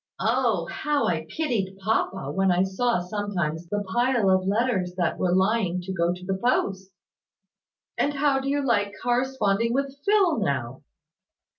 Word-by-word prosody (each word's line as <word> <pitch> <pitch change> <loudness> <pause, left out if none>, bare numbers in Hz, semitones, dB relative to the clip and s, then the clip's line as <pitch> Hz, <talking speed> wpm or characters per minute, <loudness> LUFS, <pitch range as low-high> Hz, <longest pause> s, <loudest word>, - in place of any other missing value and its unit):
Oh! - - +1
How 295 -1 -1
I 160 -2 -1
pitied 215 - -2
papa, 195 -1 -1
when 195 -1 +2
I 180 +1 +3
saw 215 +5 0
sometimes 175 -4 -3
the 205 +1 -1
pile 235 0 +1
of 185 0 +2
letters 200 -4 0
that 175 -2 0
were 180 - +1
lying 190 -2 +1
to 190 +2 -5
go 170 -1 +1
to 180 +1 -7
the 190 0 -2
post!" 195 -6 0 1.1
"And 290 0 +1
how 280 -1 +2
do 270 +1 -3
you 285 0 0
like 205 -4 +1
corresponding 240 -3 +1
with 275 0 -1
Phil 395 - +3
now?" 135 - -2
200 Hz, 155 wpm, -25 LUFS, 185-245 Hz, 1.1 s, I